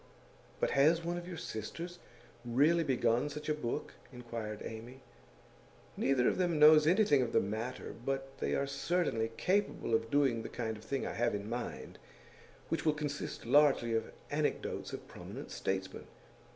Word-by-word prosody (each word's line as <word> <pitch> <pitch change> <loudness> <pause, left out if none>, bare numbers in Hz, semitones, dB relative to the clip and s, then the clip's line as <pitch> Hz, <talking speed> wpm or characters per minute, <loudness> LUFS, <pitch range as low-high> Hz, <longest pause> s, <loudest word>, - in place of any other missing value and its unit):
'But - - +1
has 160 +5 +4
one 175 +1 -2
of 175 - -10
your 180 -2 -6
sisters 165 - -6 0.4
really 145 +8 +3
begun 125 -1 +1
such 150 +1 -7
a - - +3
book?' 135 -6 -4 0.2
inquired 115 -4 -6
Amy. 120 +4 -8 0.9
'Neither 130 -2 +2
of - - +1
them 175 -3 +2
knows 150 0 +8
anything 175 -6 +5
of 120 - -2
the - - +5
matter, 110 +5 -4
but 135 0 -3
they - - 0
are 140 - +1
certainly 140 -5 0
capable 195 - 0
of 115 0 +1
doing 135 -5 +2
the - - -6
kind 110 -2 -3
of 105 - -12
thing 135 +4 -2
I - - -3
have 120 -2 +1
in 100 0 -5
mind, 120 +1 -5 0.7
which 165 - -1
will 155 -1 +2
consist 145 -2 -4
largely 140 -5 +4
of 115 - -1 0.2
anecdotes - - -1
of - - -7
prominent - - -9
statesmen. 95 0 -3
135 Hz, 165 wpm, -33 LUFS, 115-155 Hz, 0.9 s, knows